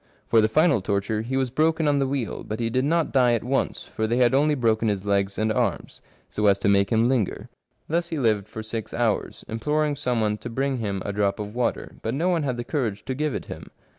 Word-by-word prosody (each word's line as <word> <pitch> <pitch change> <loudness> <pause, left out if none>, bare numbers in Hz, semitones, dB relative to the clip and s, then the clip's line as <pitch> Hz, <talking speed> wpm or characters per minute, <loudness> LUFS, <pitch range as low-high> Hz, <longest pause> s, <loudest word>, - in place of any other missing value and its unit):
For 115 - +4
the 110 - +2
final 150 - +3
torture 100 +2 -1
he 130 +4 -2
was 130 -2 0
broken 160 +3 +2
on 145 -1 +3
the 135 - +1
wheel, 130 -5 -3
but 110 +1 -5
he 115 -1 -1
did 130 +3 +1
not 165 +2 +1
die 125 -3 +4
at 115 - 0
once, 135 +2 -1
for 110 - -3
they 120 +2 0
had 125 0 +4
only 150 +2 +3
broken 115 -3 +1
his 100 -2 -1
legs 100 -1 0
and 110 0 +1
arms, 115 -8 -2 0.3
so 105 0 0
as 100 -1 +5
to 100 - -1
make 100 +1 +3
him 115 +1 +3
linger. 125 -7 -1 0.4
Thus 170 +2 -1
he 160 - -3
lived 110 -6 +1
for 110 - -7
six 110 0 -5
hours, 115 -3 -1
imploring 150 +6 0
some 125 -4 -1
one 105 -1 0
to 120 - -7
bring 135 +2 -1
him 100 -4 -3
a 100 - -2
drop 100 -1 +1
of 105 0 -5
water, 125 0 -2
but 110 +3 -2
no 170 +6 +1
one 170 -3 +1
had 130 -4 -2
the 120 - -3
courage 120 -7 -2
to 130 - -2
give 150 +1 -1
it - - -4
him. - - -9
120 Hz, 250 wpm, -24 LUFS, 105-135 Hz, 0.4 s, as